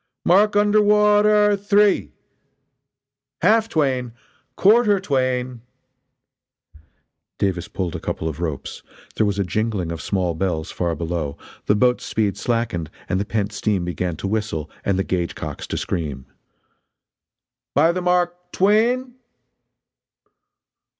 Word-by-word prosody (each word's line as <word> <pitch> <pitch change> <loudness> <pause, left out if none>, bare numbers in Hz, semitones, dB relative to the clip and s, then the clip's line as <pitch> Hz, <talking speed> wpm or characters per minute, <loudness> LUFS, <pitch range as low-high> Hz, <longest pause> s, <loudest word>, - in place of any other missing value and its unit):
"Mark 205 +4 +4
under 205 +1 +4
wa 210 0 +4
a - - +4
ter 210 -1 +4
three!" 205 0 +2 1.3
"Half 225 +1 +4
twain!" 130 - 0 0.4
"Quarter 210 0 +4
twain! 130 -6 -1 0.8
" 80 +1 -31
Davis 90 -3 -1
pulled 90 -4 -4
a - - -4
couple 80 - -4
of 80 -1 -5
ropes 80 -5 -4 0.3
there 110 - +2
was 100 -1 -1
a 100 - +1
jingling 100 -3 -2
of 85 - -5
small 90 -4 -1
bells 85 -2 -2
far 85 -2 -2
below, 80 -3 -3 0.3
the 105 - +4
boat's 125 +3 +2
speed 105 -3 -1
slackened, 110 -8 -2 0.2
and 95 - 0
the 100 - -1
pent 105 -1 -2
steam 100 -3 -1
began 90 -1 -3
to 95 - -5
whistle 105 -7 -3
and 100 -2 0
the 95 - +1
gauge 90 -3 -2
cocks - - -6
to - - -3
scream: 70 -6 -3 1.5
"By 160 +5 +5
the 180 +1 -3
mark 180 0 0
twain!" 235 +6 +2
110 Hz, 135 wpm, -21 LUFS, -, 1.5 s, By